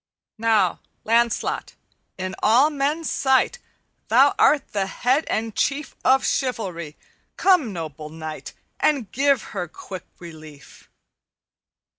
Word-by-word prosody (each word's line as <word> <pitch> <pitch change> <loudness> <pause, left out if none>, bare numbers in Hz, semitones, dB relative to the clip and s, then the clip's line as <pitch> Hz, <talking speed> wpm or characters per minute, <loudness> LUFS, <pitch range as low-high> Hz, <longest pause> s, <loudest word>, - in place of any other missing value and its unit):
"'Now, 215 -5 +2 0.2
Lancelot, 230 +1 0 0.4
in 185 0 -4
all 255 +8 +4
men's 295 +3 -1
sight 265 - +2 0.5
Thou - - +5
art 290 -2 +4
the 195 -2 0
head 255 +9 +1
and 225 -1 -2
chief 280 +1 -1
Of 265 +1 +4
chivalry. 190 - -2 0.4
Come, 360 - +3
noble 155 -4 -7
knight, 155 0 -8 0.3
And 265 -10 +1
give 275 -2 +2
her 175 - -3
quick 185 +3 -9
relief.' 155 -4 -13
225 Hz, 110 wpm, -23 LUFS, 175-275 Hz, 0.5 s, Thou